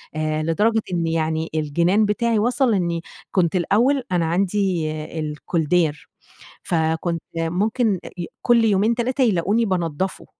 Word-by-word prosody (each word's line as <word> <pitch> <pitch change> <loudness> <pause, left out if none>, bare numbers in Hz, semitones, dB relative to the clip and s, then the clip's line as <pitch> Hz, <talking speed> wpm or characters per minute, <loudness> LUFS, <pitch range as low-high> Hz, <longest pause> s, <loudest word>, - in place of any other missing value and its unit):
آآ، 155 0 -1
لدرجة 215 +7 +2
إن 170 -1 0
يعني 160 0 -1
الجنان 170 +7 +2
بتاعي 225 +1 +1
وصل 245 +2 +2
إني 170 -3 0 0.3
كنت 180 -1 +1
الأول 245 +10 +2
أنا 175 -2 +1
عندي 180 -1 0 0.6
koldair 160 -2 +2 0.7
فكنت 165 0 -1 0.2
ممكن 195 +5 0
أ - - -7 0.3
كل 235 -2 +4
يومين، 215 +2 +2
3 255 +3 -1
يلاقوني 210 +2 +2
بانضّفه، 180 -2 -2
180 Hz, 120 wpm, -22 LUFS, 165-220 Hz, 0.7 s, كل